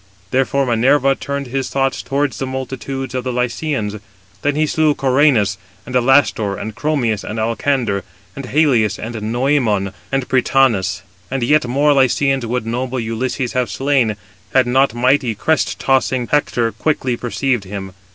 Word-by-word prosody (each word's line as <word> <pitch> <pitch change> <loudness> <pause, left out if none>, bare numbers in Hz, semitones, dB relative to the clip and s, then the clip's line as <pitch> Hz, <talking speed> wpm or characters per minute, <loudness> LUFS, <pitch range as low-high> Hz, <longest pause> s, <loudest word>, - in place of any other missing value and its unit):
Therefore 135 +1 +1
Minerva 130 +3 +3
turned 140 0 -4
his 135 +1 -3
thoughts 135 -1 0
towards 140 0 -1
the 135 - -2
multitude 130 0 -5
of 130 -1 -2
the 130 - -2
Lycians. 125 -3 -2 0.4
Then 145 0 0
he 155 +1 +2
slew 155 -1 +2
Cœranus, 130 -7 +3 0.3
and 125 - -8
Alastor, 125 -5 +3
and 110 +1 -5
Chromius, 120 -6 -1
and 110 - -5
Alcander, 115 -2 0 0.3
and 140 -2 -6
Halius, 125 -7 +2
and 115 +2 -6
Noëmon, 110 -3 0 0.2
and 135 -2 -1
Prytanis. 120 -7 +2 0.3
And 135 -1 -2
yet 145 +1 +3
more 145 +4 +3
Lycians 135 -1 +2
would 125 0 -2
noble 125 +2 -2
Ulysses 120 +2 -2
have 125 -1 0
slain, 135 -6 +1 0.4
had 130 -1 +5
not 130 0 +2
mighty 125 -1 +2
crest 160 +9 0
tossing 130 -2 +1
Hector 120 -5 +1
quickly 130 -4 -1
perceived 120 -2 -1
him. 95 -1 -7
130 Hz, 150 wpm, -18 LUFS, 115-135 Hz, 0.4 s, had